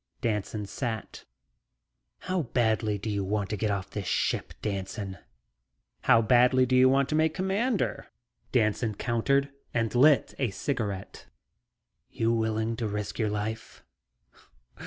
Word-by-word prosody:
Danson 105 Hz, -3 st, -2 dB
sat. 110 Hz, +1 st, -5 dB, 1.0 s
"How 185 Hz, -1 st, -1 dB
badly 110 Hz, -5 st, 0 dB
do 100 Hz, -, -7 dB
you 100 Hz, -2 st, -1 dB
want 100 Hz, 0 st, -2 dB
to -, -, 0 dB
get 105 Hz, +1 st, -1 dB
off 100 Hz, -1 st, -3 dB
this 100 Hz, -3 st, -4 dB
ship, -, -, -1 dB
Danson?" 95 Hz, -1 st, -4 dB, 0.9 s
"How 115 Hz, -, +6 dB
badly 125 Hz, +3 st, +5 dB
do 130 Hz, +1 st, +1 dB
you 130 Hz, +1 st, +6 dB
want 135 Hz, 0 st, +3 dB
to -, -, -1 dB
make 160 Hz, 0 st, +2 dB
Commander?" 200 Hz, +5 st, -1 dB, 0.4 s
Danson 110 Hz, -2 st, +1 dB
countered 135 Hz, +5 st, +1 dB, 0.2 s
and 115 Hz, -2 st, 0 dB
lit 140 Hz, +4 st, +4 dB
a 130 Hz, -4 st, +1 dB
cigarette. 100 Hz, -4 st, -4 dB, 0.8 s
"You 115 Hz, +1 st, 0 dB
willing 110 Hz, 0 st, 0 dB
to 115 Hz, -, -2 dB
risk 105 Hz, +1 st, -4 dB
your 110 Hz, -2 st, +1 dB
life?" 105 Hz, +2 st, -5 dB
115 Hz, 135 wpm, -28 LUFS, 105-130 Hz, 1.0 s, How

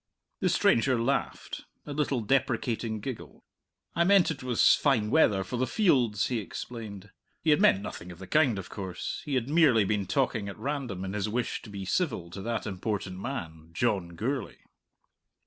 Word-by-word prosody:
The -, -, +2 dB
stranger 125 Hz, +1 st, +3 dB
laughed: 135 Hz, +4 st, -2 dB, 0.2 s
a 145 Hz, -, -5 dB
little 140 Hz, -4 st, 0 dB
deprecating 115 Hz, -2 st, 0 dB
giggle. 130 Hz, +1 st, -7 dB, 0.5 s
"I 170 Hz, -, +4 dB
meant 190 Hz, -2 st, +5 dB
it 140 Hz, -3 st, -6 dB
was 125 Hz, -3 st, +4 dB
fine 115 Hz, -7 st, +2 dB
weather 105 Hz, -11 st, +4 dB
for 120 Hz, +6 st, -4 dB
the 130 Hz, +1 st, 0 dB
fields," 125 Hz, -, +2 dB
he 125 Hz, -3 st, -1 dB
explained. 105 Hz, -2 st, -7 dB, 0.3 s
He 160 Hz, -, +4 dB
had 150 Hz, -, +4 dB
meant 95 Hz, -, +5 dB
nothing 90 Hz, -3 st, -7 dB
of 85 Hz, -, -11 dB
the 95 Hz, -, -9 dB
kind, 130 Hz, -1 st, +3 dB
of 95 Hz, -, -6 dB
course; 95 Hz, -3 st, -5 dB
he 145 Hz, -3 st, -1 dB
had 125 Hz, -2 st, 0 dB
merely 145 Hz, -8 st, +5 dB
been 100 Hz, 0 st, -1 dB
talking 125 Hz, -7 st, 0 dB
at 100 Hz, -, -8 dB
random 130 Hz, -10 st, -3 dB
in 95 Hz, -, -4 dB
his 105 Hz, 0 st, -1 dB
wish 120 Hz, +3 st, -2 dB
to -, -, -12 dB
be 100 Hz, -1 st, -6 dB
civil 95 Hz, -, -1 dB
to 95 Hz, -, -7 dB
that 115 Hz, +2 st, -2 dB
important 95 Hz, -1 st, -3 dB
man, 80 Hz, -10 st, -6 dB
John 90 Hz, -4 st, 0 dB
Gourlay. 130 Hz, +8 st, -3 dB
115 Hz, 180 wpm, -28 LUFS, 100-135 Hz, 0.5 s, meant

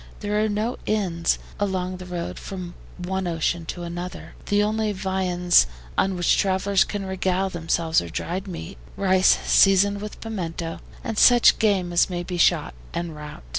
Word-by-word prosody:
There 210 Hz, 0 st, 0 dB
are 220 Hz, -, +1 dB
no 215 Hz, +4 st, -2 dB
inns 180 Hz, -6 st, 0 dB, 0.2 s
along 185 Hz, -2 st, -2 dB
this 180 Hz, 0 st, -10 dB
road 175 Hz, -1 st, -5 dB
from 185 Hz, -3 st, -7 dB, 0.2 s
one 185 Hz, +1 st, -3 dB
ocean 165 Hz, 0 st, -1 dB
to 175 Hz, -, -5 dB
another. 175 Hz, +1 st, -7 dB
The 205 Hz, 0 st, +3 dB
only 215 Hz, 0 st, 0 dB
viands 185 Hz, -, +2 dB, 0.3 s
on 190 Hz, 0 st, +1 dB
which 175 Hz, -1 st, +2 dB
travelers 195 Hz, 0 st, +2 dB
can 205 Hz, -2 st, -5 dB
regale 190 Hz, 0 st, -1 dB
themselves 165 Hz, -1 st, 0 dB
are 85 Hz, -, -7 dB
dried 185 Hz, -, -4 dB
meat, 80 Hz, -, -7 dB, 0.2 s
rice 190 Hz, -1 st, +4 dB
seasoned 200 Hz, +1 st, +4 dB
with 210 Hz, 0 st, -7 dB
pimento, 170 Hz, -6 st, -5 dB, 0.2 s
and 225 Hz, -2 st, -2 dB
such 245 Hz, -1 st, +6 dB
game 195 Hz, -5 st, +1 dB
as 170 Hz, -, +3 dB
may 175 Hz, -1 st, -3 dB
be 180 Hz, 0 st, -5 dB
shot 60 Hz, -, +3 dB, 0.2 s
en 170 Hz, -1 st, -3 dB
route. 150 Hz, -, -10 dB
185 Hz, 165 wpm, -24 LUFS, 175-200 Hz, 0.3 s, such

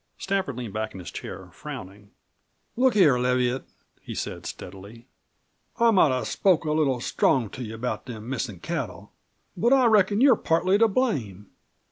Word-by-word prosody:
Stafford 190 Hz, -9 st, -2 dB
leaned 120 Hz, -5 st, -6 dB
back 110 Hz, 0 st, -3 dB
in 95 Hz, -, -9 dB
his 90 Hz, -, -8 dB
chair, -, -, -8 dB
frowning. 100 Hz, +2 st, -9 dB, 0.7 s
"Look 255 Hz, 0 st, +3 dB
here, 150 Hz, -11 st, +5 dB
Leviatt," 125 Hz, +1 st, 0 dB, 0.4 s
he -, -, -8 dB
said -, -, -5 dB
steadily. 100 Hz, +5 st, -10 dB, 0.7 s
"I 235 Hz, -2 st, +5 dB
might 185 Hz, -7 st, +5 dB
have 130 Hz, -1 st, -1 dB
spoke 180 Hz, -5 st, +2 dB
a 155 Hz, -, 0 dB
little 145 Hz, -5 st, +1 dB
strong 120 Hz, -2 st, +1 dB
to -, -, -8 dB
you 110 Hz, -1 st, -6 dB
about 125 Hz, +3 st, -4 dB
them 110 Hz, -2 st, -8 dB
missin' 120 Hz, -8 st, -4 dB
cattle. -, -, -5 dB, 0.4 s
But 235 Hz, +9 st, +3 dB
I 265 Hz, -2 st, +5 dB
reckon 210 Hz, -2 st, +4 dB
you're 265 Hz, -1 st, +6 dB
partly 185 Hz, +3 st, +1 dB
to 225 Hz, -, +6 dB
blame. 125 Hz, -, -2 dB
130 Hz, 165 wpm, -25 LUFS, -, 0.7 s, you're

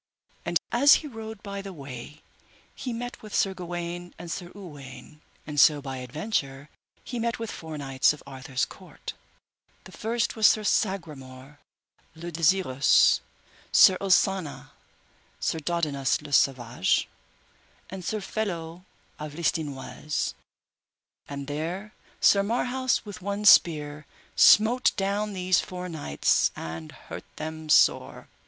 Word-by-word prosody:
And 175 Hz, -, +2 dB
as 280 Hz, +4 st, +7 dB
he -, -, -4 dB
rode 220 Hz, -5 st, -8 dB
by 200 Hz, -1 st, -5 dB
the 195 Hz, 0 st, -8 dB
way, 140 Hz, 0 st, -10 dB, 0.5 s
he 255 Hz, -, -5 dB
met 245 Hz, +1 st, -6 dB
with 215 Hz, -1 st, -7 dB
Sir 195 Hz, -, +2 dB
Gawaine 175 Hz, -1 st, -6 dB
and 170 Hz, -1 st, -8 dB
Sir 175 Hz, +2 st, -5 dB
Uwaine, 145 Hz, -5 st, -11 dB, 0.2 s
and 150 Hz, -1 st, -3 dB
so 150 Hz, -1 st, +6 dB
by 135 Hz, -2 st, -6 dB
adventure 140 Hz, -, -3 dB, 0.3 s
he 245 Hz, -, -5 dB
met 235 Hz, 0 st, -1 dB
with 230 Hz, -2 st, -5 dB
four 160 Hz, -2 st, -7 dB
knights 135 Hz, -2 st, +2 dB
of 150 Hz, -, -9 dB
Arthur's 130 Hz, -1 st, -3 dB
court, -, -, -10 dB, 0.7 s
the 190 Hz, -, -13 dB
first 225 Hz, +2 st, -2 dB
was 220 Hz, -2 st, +6 dB
Sir 215 Hz, -, +3 dB
Sagramore 145 Hz, -10 st, -2 dB, 0.6 s
le 170 Hz, +2 st, -7 dB
Desirous, 160 Hz, -5 st, +4 dB, 0.5 s
Sir 185 Hz, -, +7 dB
Osanna, 190 Hz, -4 st, +1 dB, 0.7 s
Sir 160 Hz, -, -1 dB
Dodinas 150 Hz, -4 st, 0 dB
le 145 Hz, -1 st, -8 dB
Savage, 120 Hz, -7 st, +2 dB, 0.8 s
and 190 Hz, -1 st, -7 dB
Sir 215 Hz, +4 st, -2 dB
Felot 175 Hz, -5 st, -4 dB, 0.4 s
of 150 Hz, -1 st, -7 dB
Listinoise; 150 Hz, -3 st, -2 dB, 1.0 s
and 140 Hz, -1 st, -5 dB
there 170 Hz, +9 st, -4 dB, 0.3 s
Sir 200 Hz, -, +5 dB
Marhaus 245 Hz, +4 st, 0 dB
with 205 Hz, -3 st, -9 dB
one 200 Hz, +2 st, -3 dB
spear 150 Hz, -6 st, +5 dB, 0.3 s
smote 235 Hz, +4 st, +6 dB
down 200 Hz, +2 st, -1 dB
these 185 Hz, -1 st, +2 dB
four 180 Hz, 0 st, -5 dB
knights, 150 Hz, -, +1 dB
and 80 Hz, -1 st, -7 dB
hurt -, -, -10 dB
them 160 Hz, 0 st, -6 dB
sore. -, -, +3 dB
170 Hz, 130 wpm, -26 LUFS, 145-200 Hz, 1.0 s, as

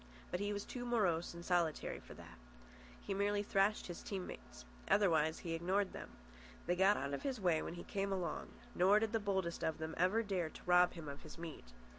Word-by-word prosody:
But 180 Hz, -, -1 dB
he 205 Hz, +1 st, -1 dB
was 205 Hz, 0 st, -3 dB
too 245 Hz, -, -5 dB
morose 190 Hz, -9 st, +1 dB
and 170 Hz, 0 st, -8 dB
solitary 170 Hz, -4 st, +1 dB
for -, -, -12 dB
that. -, -, -12 dB, 0.6 s
He -, -, -2 dB
merely 205 Hz, +1 st, +1 dB
thrashed 200 Hz, +1 st, +2 dB
his 175 Hz, -, -6 dB
team 190 Hz, -3 st, -4 dB
mates. 60 Hz, 0 st, -10 dB, 0.2 s
Otherwise 160 Hz, -6 st, +3 dB
he 165 Hz, -, -1 dB
ignored 185 Hz, +4 st, 0 dB
them. -, -, -7 dB, 0.6 s
They 175 Hz, -, +1 dB
got 195 Hz, +3 st, +5 dB
out 140 Hz, +1 st, -2 dB
of 140 Hz, -, -2 dB
his 265 Hz, -4 st, -2 dB
way 175 Hz, -5 st, +2 dB
when 170 Hz, -, -5 dB
he 175 Hz, -, -7 dB
came 195 Hz, 0 st, -2 dB
along; 180 Hz, -5 st, -2 dB, 0.3 s
nor 190 Hz, +4 st, +5 dB
did 220 Hz, 0 st, +1 dB
the 225 Hz, -, +3 dB
boldest 190 Hz, -4 st, -1 dB
of 160 Hz, -, 0 dB
them 160 Hz, 0 st, -4 dB
ever 185 Hz, +6 st, +3 dB
dare 185 Hz, -6 st, -1 dB
to -, -, -12 dB
rob 180 Hz, 0 st, +5 dB
him 165 Hz, -3 st, -8 dB
of 140 Hz, 0 st, -6 dB
his -, -, -11 dB
meat. 165 Hz, -, -7 dB
180 Hz, 215 wpm, -37 LUFS, 165-205 Hz, 0.6 s, got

